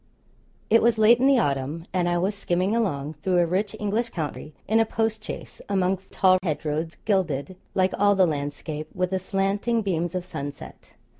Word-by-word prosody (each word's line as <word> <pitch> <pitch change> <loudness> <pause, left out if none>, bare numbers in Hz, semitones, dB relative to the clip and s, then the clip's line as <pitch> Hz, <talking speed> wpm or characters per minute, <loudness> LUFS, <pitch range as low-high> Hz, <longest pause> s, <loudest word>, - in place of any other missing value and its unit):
It 230 - +6
was 235 0 +3
late 220 +2 +6
in 265 - +4
the 275 -1 +5
autumn, 145 - -1
and 180 -2 +1
I 175 - +1
was 190 +4 0
skimming 190 +1 0
along, 155 -10 -1
through 185 +1 +1
a 175 - +4
rich 195 +4 -1
English 215 +3 -1
county, 150 - -5
in 220 +1 +3
a - - +6
postchaise, 220 -1 -3
among 190 -1 +1
tall 185 -1 +4
hedgerows 160 -1 -2
gilded, 185 -5 0 0.2
like 185 -1 +2
all 205 0 +4
the 190 -1 +5
landscape, 150 0 -4
with 180 0 -1
the 190 - 0
slanting 200 +4 0
beams 175 -2 -1
of 180 -1 -2
sunset. 145 -5 -8
185 Hz, 175 wpm, -25 LUFS, 160-205 Hz, 0.2 s, It